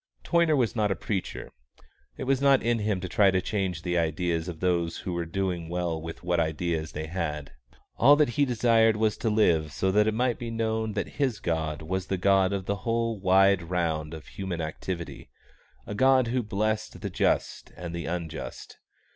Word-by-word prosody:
Toyner 170 -3 +3
was 125 -5 +1
not 105 -2 +1
a 95 - 0
preacher. 95 +2 -4 0.7
It - - -4
was 135 0 +1
not 140 -1 +4
in 120 0 +1
him 105 -2 0
to 90 - -4
try 100 +2 +4
to 95 -1 +2
change 95 -4 -2
the 90 -1 0
ideas 85 +1 -1
of 85 -3 -6
those 85 -2 0
who 90 - -5
were 85 -1 -2
doing 90 -2 -2
well 85 -2 -2
with 80 +2 -8
what 90 -1 +1
ideas 80 0 -1
they 80 +1 -4
had. 80 -4 -4 0.5
All 140 +4 +7
that 150 -3 +3
he 145 +4 +1
desired 115 -3 +3
was 110 -1 +1
to 115 - -1
live 85 -8 +2
so 95 +5 0
that 105 +2 +3
it 110 - +1
might 125 0 0
be 120 - -5
known 110 -1 -1
that 105 - -2
his 130 -7 +1
God 80 -2 -2
was 95 +3 -3
the 95 - -1
God 95 0 +3
of 100 -2 -2
the 100 +1 -1
whole 115 0 -1
wide 95 0 +4
round 80 -3 -1
of 80 - -10
human 95 -3 -5
activity, 85 0 -5 0.6
a - - -5
God 130 +2 +4
who 125 +1 +1
blessed 110 0 -2
the - - -3
just - - 0
and 85 -1 -6
the 85 -1 -4
unjust. 85 -1 -6
95 Hz, 195 wpm, -27 LUFS, 85-110 Hz, 0.7 s, All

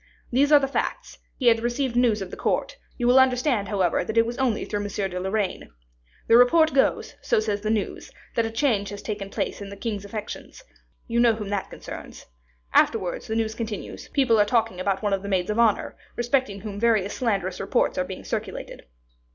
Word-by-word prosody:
These 280 +4 +3
are 295 - +9
the 275 -1 +1
facts: 275 - -3 0.2
he 260 - -4
had 230 -1 +6
received 240 +2 -1
news 230 -4 +3
of 185 - -9
the - - -6
court; - - -1 0.2
you 245 - -1
will 250 +2 +6
understand, 255 -4 +2
however, 185 -4 +1
that 220 - -4
it 230 - +6
was 235 +1 -4
only 250 -5 +1
through 205 - -3
M. 205 - -3
de 190 -2 -3
Lorraine. 190 - -2 0.6
The 230 - +6
report 315 +6 +5
goes, 270 - +1
so - - +2
says 210 -2 -1
the 215 - -2
news, 215 -2 -2 0.2
that 230 - +2
a - - -4
change 225 -4 0
has 205 0 -8
taken 205 -2 -4
place - - -3
in 200 - -6
the 200 - -8
king's 210 -3 -3
affections. 210 - -7 0.4
You 235 -1 0
know 235 -2 +5
whom 210 -2 -6
that 200 -2 -2
concerns. - - -9 0.5
Afterwards, 190 -6 +2
the 220 - -2
news 220 -1 0
continues, 220 -3 -6
people 255 -6 +2
are 205 - +5
talking 225 -4 +1
about 195 +2 -1
one 205 -1 +1
of 195 - 0
the 200 - -6
maids 185 0 0
of 215 - -1
honor, 225 -3 +2 0.2
respecting 240 -4 0
whom 205 -2 -6
various 215 -3 +2
slanderous 195 -7 -1
reports - - +1
are - - +2
being - - -8
circulated. - - -5
220 Hz, 210 wpm, -25 LUFS, 200-240 Hz, 0.6 s, are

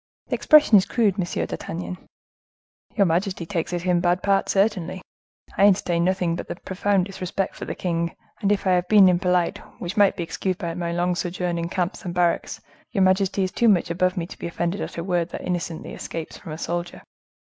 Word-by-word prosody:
"The - - -3
expression 295 -9 +6
is 190 - -2
crude, 210 -5 +1
Monsieur 175 -2 -1
d'Artagnan." 175 +2 -5 1.0
"Your 200 - +4
majesty 180 +1 0
takes 165 -1 -3
it 175 0 -3
in 180 -1 +3
bad 175 +1 +1
part, 195 -1 +2
certainly. 190 -3 0 0.5
I 200 - +6
entertain 175 -4 +2
nothing 180 -2 +1
but - - -6
the - - -4
profoundest 190 +1 -1
respect 185 +1 -2
for - - -6
the - - -5
king; 170 -2 -2 0.3
and 200 - +2
if 205 - 0
I 190 - +3
have 180 0 +2
been 205 -1 +7
impolite, 180 -1 +2 0.2
which 180 +4 -5
might 200 -2 +5
be 175 - -3
excused 185 +2 -2
by 170 -4 -4
my 170 0 -3
long 175 +1 0
sojourn 175 -1 -2
in 170 0 -3
camps 180 -1 -2
and 175 -1 -5
barracks, 175 -1 0 0.3
your 195 -4 +2
majesty 190 +1 +2
is 185 - -1
too 235 - +3
much 180 -4 +2
above 185 +2 +1
me 170 - -1
to - - -12
be - - -4
offended 170 +3 -2
at - - -6
a 170 - -2
word 175 -2 0
that - - -6
innocently 175 -2 -4
escapes 165 -1 -6
from 160 - -10
a - - -6
soldier." 175 +1 -4
180 Hz, 210 wpm, -24 LUFS, 170-195 Hz, 1.0 s, been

